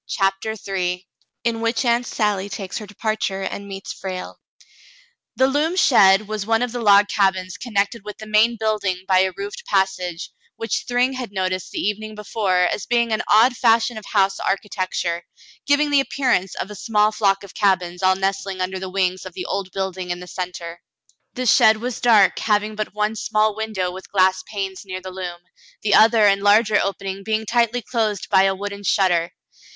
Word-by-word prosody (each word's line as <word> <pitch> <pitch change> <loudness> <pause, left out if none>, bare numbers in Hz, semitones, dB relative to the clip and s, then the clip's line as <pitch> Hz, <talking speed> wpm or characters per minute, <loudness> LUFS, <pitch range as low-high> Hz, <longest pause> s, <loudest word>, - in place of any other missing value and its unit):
CHAPTER 195 +2 -1
III 180 -1 -2 0.4
IN 230 -1 -1
WHICH 230 +3 0
AUNT 240 +1 +1
SALLY 205 -3 -1
TAKES 195 -2 -5
HER 210 - -9
DEPARTURE 210 -2 -2
AND 200 +1 -5
MEETS 195 -1 -7
FRALE 185 -1 -7 1.0
The 260 - +3
loom 295 +6 0
shed 205 - +5
was 215 -1 -3
one 225 +3 +1
of 245 - -2
the 245 0 -4
log 205 -1 +6
cabins 190 -3 0
connected 210 -2 -2
with 210 0 -8
the 215 - -9
main 215 +2 +3
building 205 -4 -1
by 185 -1 +4
a 190 0 +2
roofed 415 +5 -6
passage, 180 - -1 0.2
which 225 - -3
Thryng 245 +2 +2
had 255 -5 -6
noticed 185 -2 -2
the - - -8
evening 215 +1 -3
before 205 -3 0
as 185 +2 -1
being 235 -1 +1
an 215 - 0
odd 235 +4 +5
fashion 230 0 +2
of 215 -1 -8
house 195 -2 +1
architecture, 185 -3 -2 0.5
giving 290 +1 +3
the 285 - +5
appearance 255 -9 0
of 205 - -5
a - - -8
small 210 +1 +1
flock 200 -2 +1
of 200 - -12
cabins 180 -3 0
all 185 0 +4
nestling 195 0 -2
under 185 +1 -2
the 190 0 -5
wings 185 -1 -1
of 185 - -9
the 180 - -6
old 195 -1 -3
building 190 -1 -4
in 175 0 -3
the 180 - -9
centre. 175 -1 -6 0.5
The 255 - -3
shed 220 -1 +5
was 245 +2 -5
dark, 220 -5 +4
having 210 0 0
but 215 0 -5
one 210 +1 0
small 215 -1 0
window 215 -5 -3
with 190 +1 -11
glass 185 -1 +3
panes 195 -3 -5
near 185 -2 -6
the 185 0 -8
loom, 180 -2 -6 0.4
the 210 - +1
other 220 -1 +6
and 200 -1 +3
larger 210 +1 +4
opening 195 0 -4
being 220 +1 -1
tightly 235 +1 +1
closed 215 -4 -2
by 190 -1 +5
a 195 0 +1
wooden 200 +1 -6
shutter. 175 -4 +2
205 Hz, 190 wpm, -21 LUFS, 190-220 Hz, 1.0 s, log